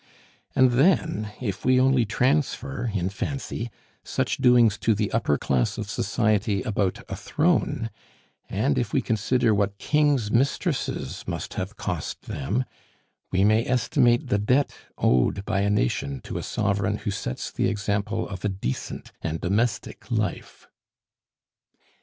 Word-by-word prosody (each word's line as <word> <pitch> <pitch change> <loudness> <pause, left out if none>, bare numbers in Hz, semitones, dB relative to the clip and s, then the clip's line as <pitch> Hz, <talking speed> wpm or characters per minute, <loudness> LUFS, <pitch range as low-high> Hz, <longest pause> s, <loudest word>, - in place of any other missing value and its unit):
And 130 -1 +5
then, 135 - +2
if 100 -6 -4
we 130 0 +4
only 130 -2 +4
transfer, 130 +1 0
in 95 -2 -1
fancy, 120 +2 -4 0.3
such - - -1
doings 120 -5 +5
to 110 - +2
the 105 0 -1
upper 110 -11 +1
class 65 -3 0
of - - -4
society 105 -2 +1
about 100 -3 -1
a - - -4
throne, - - 0 0.6
and 130 +7 +1
if 120 -2 -3
we 135 - +3
consider 115 +1 +2
what 100 -1 0
kings' 145 -7 +2
mistresses 135 +5 0
must - - -4
have - - -4
cost - - -4
them, 100 - -2 0.7
we 95 +1 +2
may 110 +2 +4
estimate 125 -1 +2
the 105 - +2
debt 125 +7 +2 0.2
owed 65 +11 +2
by 100 -3 0
a 100 - +1
nation 70 -6 0
to - - -5
a - - -4
sovereign - - 0
who - - -3
sets 65 - -4
the - - 0
example 105 +2 -1
of 95 -3 -7
a 105 - +1
decent 95 -10 -4
and 80 0 -2
domestic 110 +8 -1
life. 110 -4 -3
110 Hz, 140 wpm, -25 LUFS, 100-125 Hz, 0.7 s, And